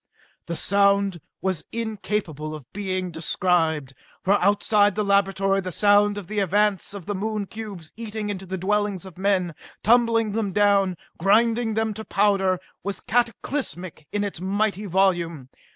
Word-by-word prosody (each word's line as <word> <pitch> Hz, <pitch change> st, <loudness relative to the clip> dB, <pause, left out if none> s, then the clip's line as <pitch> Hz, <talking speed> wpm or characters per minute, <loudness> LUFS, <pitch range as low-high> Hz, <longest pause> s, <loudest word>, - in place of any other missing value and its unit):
The 170 Hz, -, -3 dB
sound 200 Hz, -2 st, +2 dB, 0.2 s
was 185 Hz, -5 st, -1 dB
incapable 200 Hz, -9 st, -3 dB
of 150 Hz, -4 st, -10 dB
being 185 Hz, -2 st, -2 dB
described, 160 Hz, -3 st, 0 dB, 0.3 s
for 195 Hz, -, +3 dB
outside 205 Hz, +1 st, +3 dB
the 210 Hz, -, 0 dB
laboratory 195 Hz, -1 st, +2 dB
the 185 Hz, -1 st, -5 dB
sound 205 Hz, +2 st, +4 dB
of 205 Hz, -, -5 dB
the 210 Hz, +4 st, -2 dB
advance 205 Hz, +1 st, +1 dB
of 195 Hz, -5 st, -8 dB
the 205 Hz, -, -2 dB
Moon 210 Hz, +1 st, -2 dB
cubes 200 Hz, -6 st, -8 dB
eating 220 Hz, -2 st, -4 dB
into 190 Hz, -1 st, -6 dB
the 190 Hz, +1 st, -3 dB
dwellings 200 Hz, 0 st, 0 dB
of 185 Hz, -2 st, -12 dB
men, 190 Hz, -3 st, +1 dB, 0.3 s
tumbling 230 Hz, -1 st, +4 dB
them 205 Hz, -2 st, -2 dB
down, 200 Hz, -3 st, +3 dB, 0.2 s
grinding 225 Hz, +4 st, +3 dB
them 220 Hz, -1 st, 0 dB
to 220 Hz, +1 st, -7 dB
powder, 195 Hz, -3 st, +2 dB, 0.2 s
was 200 Hz, 0 st, -3 dB
cataclysmic 230 Hz, -, -2 dB
in 205 Hz, 0 st, -1 dB
its 200 Hz, -4 st, -5 dB
mighty 205 Hz, +2 st, -1 dB
volume. 170 Hz, -7 st, +1 dB
200 Hz, 150 wpm, -24 LUFS, 185-210 Hz, 0.3 s, sound